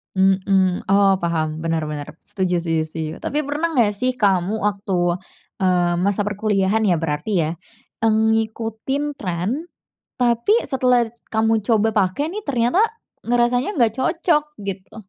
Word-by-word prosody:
Mhm. 190 -1 +2
Oh, 195 -1 +5
paham, 160 -1 -1
benar 165 -2 -1
benar. 150 -1 -5
Setuju 180 -3 -1
setuju- 165 -1 0
setuju. 155 0 -5
Tapi 295 0 -2
pernah 310 +3 -1
nggak 220 -7 +2
sih 255 +5 +1
kamu 195 0 +2
waktu, 195 -4 0 0.5
eee, 175 -1 +2
masa 200 +3 0
perkuliahan 210 0 +1
ya, 175 -6 +2
berarti 165 +6 -3 0.2
ya, - - -2 0.5
mmm, 220 0 +3
ngikutin 225 +6 -2
trend, 210 - -3 0.5
tapi 240 - +2
setelah 250 -3 +2 0.2
kamu 220 -1 +2
coba 225 0 +2
pake 200 +9 +1
nih, 405 +5 -5
ternyata 250 - +1 0.4
ngerasanya 245 - +1
nggak 225 -2 +3
cocok, 325 -1 +2 0.2
gitu? 190 +1 -6
210 Hz, 135 wpm, -21 LUFS, 180-240 Hz, 0.5 s, Oh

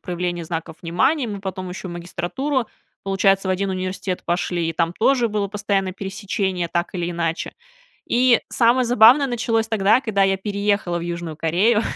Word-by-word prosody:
проявления 175 -1 -3
знаков 165 -1 -5
внимания, 235 - +1
мы 205 -3 -5
потом 190 -1 -5
еще 185 +1 -7
в - - -7
магистратуру, 180 +10 -3 0.4
получается, 195 0 +2
в - - +2
1 190 +1 0
университет 185 0 -3
пошли, 175 -1 -1
и 165 - -1
там 165 +1 0
тоже 240 +4 +2
было 205 -2 -1
постоянно 200 -2 -1
пересечение, 190 -2 -3
так 170 +2 -2
или 175 -1 -2
иначе. 170 -1 -2 0.5
И 245 0 +4
самое 245 +2 +3
забавное 245 +4 +6
началось 230 -3 0
тогда, 220 +2 +3
когда 220 -6 0
я 195 0 +3
переехала 200 -3 -1
в - - -6
Южную 170 -2 -5
Корею. 195 +8 +2
195 Hz, 165 wpm, -21 LUFS, 175-220 Hz, 0.5 s, забавное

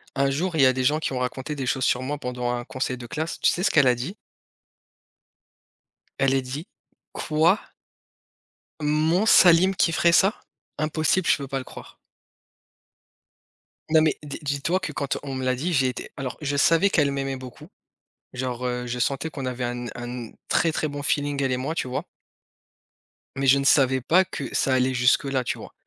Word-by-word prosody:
Un 140 0 +2
jour, 170 +5 -2
il 155 - +3
y - - +7
a 130 - +5
des 130 0 -2
gens 150 +4 +2
qui 155 - -3
ont 125 - -2
raconté 130 +3 -3
des 135 -2 -4
choses 130 +1 -1
sur 125 - +1
moi 145 +3 -3
pendant 125 -2 -3
un 120 0 -3
conseil 130 0 -3
de 120 - -9
classe, 160 +7 -4
tu - - +3
sais 180 - -2
ce - - +3
qu'elle 135 - +5
a 125 - +4
dit? 135 - -5 2.0
Elle 135 0 +3
est 135 - +2
dit: 135 +5 -6 0.5
«Quoi?» 160 +6 +2 1.2
«Mon 155 +6 +1
Salim 185 -2 +6
qui 170 - +2
ferait 170 +1 +3
ça? 195 +5 +4 0.4
Impossible, 155 +4 0
je - - +4
peux 140 -1 -6
pas 135 0 -3
le 135 - -4
croire» - - -12 1.9
non 160 0 +5
mais 155 -1 +2
des 145 -2 -7
dis-toi 145 +5 -1
que - - -4
quand 140 -1 -2
on 140 -2 -5
me 130 0 -3
l'a 130 0 +1
dit, 160 +8 -2
j'ai 135 -4 +3
été 125 - -5
alors, 130 -2 -5
je 145 -1 -2
savais 165 +6 +4
qu'elle 145 -6 +2
m'aimait 135 -1 -3
beaucoup, 130 -1 -11 0.7
genre, 125 -1 -3
heu, 125 0 -3
je 125 0 -4
sentais 140 +6 -1
qu'on 135 -4 -6
avait 125 0 -3
un 120 0 -4
un 120 -1 -7 0.2
très 165 0 +2
très 155 - -1
bon 145 0 -6
feeling 145 0 -1
elle 135 -1 0
et - - +1
moi, 135 +5 -3
tu - - -1
vois? 125 - -3 1.3
Mais 135 0 -1
je 135 +1 +6
ne - - -1
savais 130 -2 +4
pas 180 +9 +3
que 145 - -6
ça 135 - +2
allait 130 0 +2
jusque 125 +2 +3
là, 135 -2 -1
tu - - -3
vois? - - -11
140 Hz, 200 wpm, -24 LUFS, 130-155 Hz, 2.0 s, y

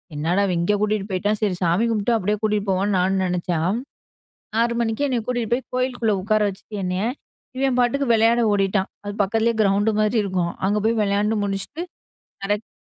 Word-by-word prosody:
என்னடா 170 +6 +1
இவன் 180 -2 0
இங்கே 205 +4 +2
கூட்டிட்டு 210 -1 0
போயிட்டான் 205 +3 0
சரி 200 -4 +1
சாமி 175 +6 +2
கும்ட்டு 225 +2 +1
அப்டியே 210 0 0
கூட்டிட்டு 210 -1 0
போவன்னு 195 +1 +1
நானும் 190 +1 +1
நெனைச்சா. 175 -2 -1 1.0
6 235 0 +2
மணிக்கே 230 +5 0
என்னை 245 -3 0
கூட்டிட்டு 240 -2 -2
போய் 255 - -3
கோயிலுக்குள்ள 245 -4 0
உட்கார 215 +2 +2
வச்சுட்டு 205 +2 -10
என்னைய 180 +3 -1 0.5
இவன் 265 -2 +1
பாட்டுக்கு 275 +3 +1
விளையாட 230 +2 +4
ஓடிட்டான். 195 -1 +1 0.2
அது 205 0 -5
பக்கத்துலயே 225 +3 +1
கிரவுண்ட் 205 +2 +2
மாரி 215 +2 +2
இருக்கும் 180 -3 -1
அங்க 210 +2 +1
போய் 230 0 +1
விளையாண்டு 205 +2 +1
முடிச்சுட்டு 200 - -3 0.6
கரெக்ட் 205 +2 -2
210 Hz, 170 wpm, -22 LUFS, 195-230 Hz, 1.0 s, விளையாட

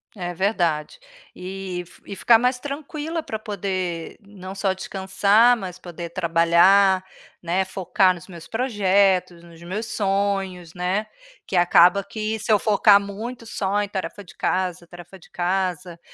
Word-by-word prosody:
É 175 -3 -5
verdade. 175 - -1 0.4
E 185 -1 -6
f - - -20
e 200 - -8
ficar 225 +4 +5
mais 250 +1 +1
tranquila 300 +3 -5
para 220 -7 -5
poder, 185 -5 -4
não 195 -1 -10
só 195 -1 0
descansar, 200 +5 +3
mas 185 -5 -7
poder 175 -1 -8
trabalhar, 185 +3 +4 0.4
né, 180 +3 0
focar 190 0 +1
nos 170 - -13
meus 170 -4 -11
projetos, 195 -7 +1
nos 170 -1 -15
meus 190 +6 -4
sonhos, 195 -4 -2
né, 185 +4 -1 0.4
que 190 - -4
acaba 175 +2 +5
que, 215 +2 -4
se 220 - -2
eu 210 - +6
focar 205 -1 +5
muito 220 +4 -7
só 205 -2 -1
em 205 - -6
tarefa 200 +1 -5
de 180 - -16
casa, 180 -2 -2
tarefa 175 +2 -13
de - - -19
casa, 180 -1 -2
190 Hz, 150 wpm, -23 LUFS, 180-205 Hz, 0.4 s, eu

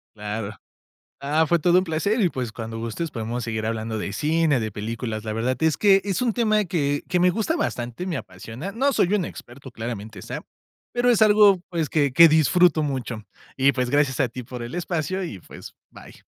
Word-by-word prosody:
Claro 105 0 -4 0.7
Ah, 155 +3 +2
fue 170 +2 +3
todo 175 +3 +4
un 185 - +3
placer 190 +7 0
y, 185 -5 +3
pues, 125 -6 -4
cuando 115 -1 -6
gustes 115 +8 -4
podemos 115 +1 -4
seguir 110 -1 -3
hablando 110 -1 -3
de 100 - -4
cine, 155 0 +1
de 110 -1 -3
películas. 110 +1 -4
La 110 - -4
verdad 120 +4 0
es 160 -1 +2
que 195 -2 +5
es 195 -3 -2
un 235 - +1
tema 215 -3 +2
que 145 -4 -1
que 180 - +1
me 180 +1 +4
gusta 220 - -1
bastante, 125 - -3
me 165 -6 -2
apasiona. 130 - -8
No 275 +6 +1
soy 200 -5 +2
un 195 -4 +1
experto, 130 -1 -10
claramente 110 -2 -6
está. - - -6 0.5
Pero 245 0 +3
es 225 -2 +2
algo, 205 -3 +6
pues, 165 -4 -2
que 145 -3 +1
que 165 +6 +8
disfruto 160 +2 +4
mucho. 125 -6 -3 0.3
Y, 135 +1 +4
pues, 125 -1 -2
gracias 145 -3 +2
a 130 -3 +2
ti 125 - -7
por 120 0 -8
el 120 - -7
espacio 175 +1 -2
y, 110 - -6
pues, - - -12 0.2
bye. - - -13
145 Hz, 205 wpm, -23 LUFS, 115-180 Hz, 0.7 s, que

